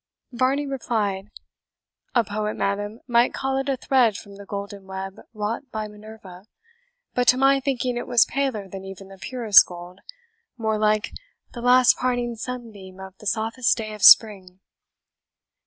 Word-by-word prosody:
Varney 260 +4 0
replied, 215 -7 -3 0.9
"A 240 - +4
poet, 210 0 -4
madam, 205 +3 -3
might 240 0 +2
call 270 0 -2
it 270 +1 -3
a 270 - 0
thread 245 -6 +2
from 200 -2 -12
the 200 -1 -12
golden 200 -1 -7
web 190 0 -7
wrought 220 +4 -4
by 215 -1 -4
Minerva; 210 -3 -13 0.7
but 245 0 0
to 250 - +6
my 275 +1 +4
thinking 255 -3 -2
it 240 - -5
was 240 -2 +4
paler 265 -8 -2
than 190 0 -9
even 195 0 -10
the 195 -1 -14
purest 230 -4 +5
gold 175 +1 -11 0.6
more 220 -2 -1
like 215 0 +1 0.4
the 240 - -7
last 250 0 +5
parting 245 -1 -1
sunbeam 220 -6 -8
of 190 0 -10
the 210 - -8
softest 230 +4 0
day 215 -2 -5
of 210 - -10
spring." 190 -5 +6
220 Hz, 155 wpm, -23 LUFS, 200-250 Hz, 0.9 s, to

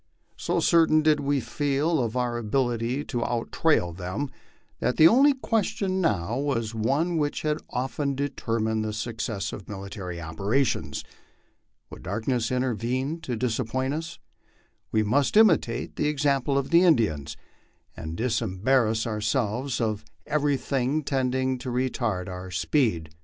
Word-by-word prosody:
So - - -1
certain 160 -2 +4
did 155 -1 +4
we 140 0 +1
feel 145 +5 0
of 115 0 -2
our 120 -1 0
ability 120 +2 0
to 120 -3 -2
out 120 -1 -2
trail 115 - +2
them, 95 +10 -4 0.5
that 125 - 0
the 160 - +9
only 275 +8 +5
question 200 -6 -1
now 110 - 0
was 115 -6 -1
one 140 +10 0
which 145 -1 -1
has 155 0 0
often 135 +2 -2
determined 115 -5 -1
the 110 0 -3
suc 115 +1 -4
cess 105 -4 -3
of 100 - -9
military 95 -3 -6
operations. 100 - -1 0.9
Would - - -10
darkness 115 +6 -1
intervene 130 +4 -1
to 125 - -3
disappoint 130 +3 -1
us? 165 +2 -5 0.7
We 110 - +2
must 140 - +2
imitate 210 - +3
the 150 - +1
example 140 -2 +1
of 140 +3 -2
the 170 +1 +6
Indians, 110 - +2 0.6
and 80 0 -6
disembarrass 115 0 +1
ourselves 115 +3 -1
of 110 -3 -1 0.2
every 145 -2 +1
thing 135 +3 -1
tending 130 -1 0
to 125 - -5
retard 120 -6 -1
our 90 0 -7
speed. 85 - 0
125 Hz, 140 wpm, -26 LUFS, 110-145 Hz, 0.9 s, the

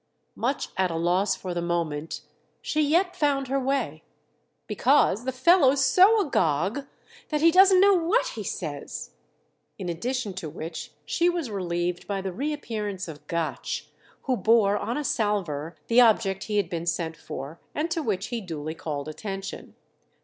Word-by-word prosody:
Much 265 +4 -1
at 190 -1 +2
a 165 - -3
loss 180 +4 +2
for 185 -2 -5
the 175 - -2
moment, 165 -3 -2 0.4
she 310 - -1
yet 345 +5 +2
found 275 -3 +1
her 275 +1 +1
way. 270 +1 -1 0.6
"Because 250 -4 +2
the 260 - 0
fellow's 270 0 +4
so 380 +11 +6
agog 195 - 0 0.4
that 300 -1 0
he 330 +1 +6
doesn't 375 +1 +7
know 400 +1 +6
what 365 +7 +2
he - - -6
says!" - - -5 0.7
In 185 -3 -5
addition 220 +5 -2
to 180 -4 -6
which 160 +2 -7
she 345 0 +2
was 340 -9 -2
relieved 175 -2 -2
by 200 -1 -2
the 190 -1 -4
reappearance 220 -7 -3
of 150 -2 -10
Gotch, 170 -1 -3 0.3
who 260 - +1
bore 220 -3 +4
on 235 +4 -2
a 300 - -2
salver 175 - -1
the 235 +2 +5
object 215 -4 +3
he 210 -1 -1
had 200 -4 +2
been 170 -1 -4
sent 165 -2 -1
for 145 +1 -8 0.2
and 320 +3 -1
to 325 - 0
which 200 -8 -2
he 240 -2 -3
duly 160 -4 -5
called 150 -3 -5
attention. 195 +4 -6
210 Hz, 165 wpm, -26 LUFS, 175-280 Hz, 0.7 s, doesn't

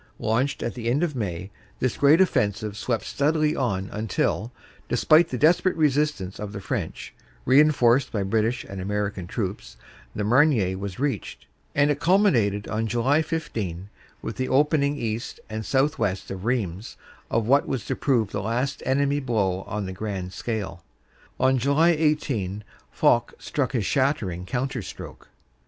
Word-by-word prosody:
Launched 130 +5 0
at - - -2
the 120 -2 -3
end 140 +7 +1
of 155 -5 -1
May, 95 -4 -4 0.3
this 130 - -1
great 145 +4 +5
offensive 105 - +1
swept 110 0 -2
steadily 155 +1 +1
on 100 -8 -1
until, 110 0 -1 0.4
despite 155 +7 +4
the 125 - -3
desperate 170 +6 +3
resist 150 -2 +2
ance 95 +1 -7
of 105 0 -5
the 100 - -5
French, - - -4 0.3
reinforced 130 -2 +4
by 105 -3 -1
British 110 +4 0
and 95 -1 -7
American 100 -2 -2
troops, 100 0 -4 0.4
the 105 - -2
Marne 110 -6 +3
was 100 -2 -5
reached, 140 +1 -3 0.3
and 145 +1 +4
it 145 - -1
culminated 150 - +3
on 110 +1 -1
July 130 +7 +2
15 110 - -4 0.3
with - - -5
the 130 - -2
opening 145 +1 +2
east 115 -2 -4
and 110 0 -4
south 140 +3 +1
west 100 -4 -2
of 95 +1 -6
Rheims 110 -5 -2 0.3
of 115 -1 +1
what 140 +5 +3
was 125 -7 -3
to - - -2
prove 120 -8 +1
the 100 - -2
last 120 +6 -2
enemy 140 +2 +2
blow 100 -8 0
on 105 -1 -3
the 95 - -5
grand 95 -2 -5
scale. 95 -7 -4 0.6
On 130 0 +3
July 140 +6 +3
18 140 - 0 0.3
Foch 120 0 +2
struck 140 -2 -2
his 115 -6 0
shattering 105 - 0
counter 125 +4 -2
stroke. 90 - -10
120 Hz, 160 wpm, -25 LUFS, 100-140 Hz, 0.6 s, great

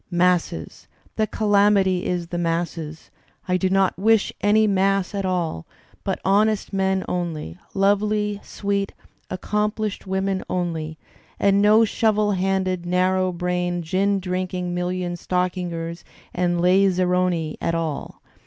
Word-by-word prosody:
Masses! 175 - 0 0.3
The 215 - +1
calamity 200 -4 +3
is 175 -2 -2
the 175 - -3
masses. 165 -2 -3 0.4
I 180 - +2
do 185 +1 +1
not 195 -1 +2
wish 220 +1 +3
any 215 +1 +4
mass 195 -1 +1
at 200 -1 -2
all, 170 - -2 0.4
but - - -2
honest 210 +2 +2
men 190 -1 +1
only, 160 - -4 0.2
lovely, 205 +1 +1
sweet 200 -1 -2 0.4
accomplished 210 +2 -2
women 190 0 -1
only, 165 -3 -2 0.4
and 200 0 +4
no 210 +2 +6
shovd 215 -2 +2
handed, 185 -1 0
narrow 185 +1 +1
brained, 175 0 -1
gin 195 +4 +1
drinking 180 -1 -3
million 180 0 -2
stoddngers 175 -1 -2 0.3
and 175 -1 0
laz 185 +1 +4
saroni 180 -3 +1
at 165 - 0
all. 160 -3 -4
185 Hz, 125 wpm, -23 LUFS, 175-200 Hz, 0.4 s, no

